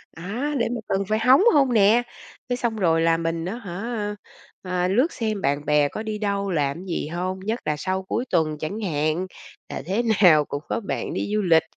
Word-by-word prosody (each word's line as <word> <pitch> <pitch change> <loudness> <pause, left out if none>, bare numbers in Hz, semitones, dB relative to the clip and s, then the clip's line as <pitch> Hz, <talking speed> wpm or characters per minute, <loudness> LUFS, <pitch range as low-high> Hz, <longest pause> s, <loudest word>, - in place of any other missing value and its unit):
á, 230 - -3
để - - +1
mà - - -3
cần 195 +1 0
phải 215 - +2
hóng 255 - +6
hông 275 -4 +4
nè. 220 +3 +5 0.5
Cái 245 - 0
xong 235 -2 -1
rồi 165 -6 +2
là 165 0 +3
mình 165 0 -2
á 190 +5 -3
hả, 210 +1 -4 0.5
à, 180 -1 -1
lướt 250 - +2
xem 215 -4 -2
bạn 145 +2 0
bè 150 -1 +3
có 215 - -5
đi 215 -1 -3
đâu, 200 -2 -1
làm 145 -4 0
cái 180 - -9
gì 170 - -2
hông, 180 +3 -3
nhất 220 +5 -2
là 150 - 0
sau 190 +4 -2
cuối 235 +6 -2
tuần 155 -3 +1
chẳng 195 +8 -4
hạn. 155 0 -1 0.4
Là - - -5
thế 200 +8 0 0.2
nào 155 -6 +7
cũng 145 +1 -5
có - - 0
bạn 210 - -4
đi 205 - -3
du 215 - +2
lịch, 165 -4 +4
190 Hz, 220 wpm, -24 LUFS, 165-220 Hz, 0.5 s, nào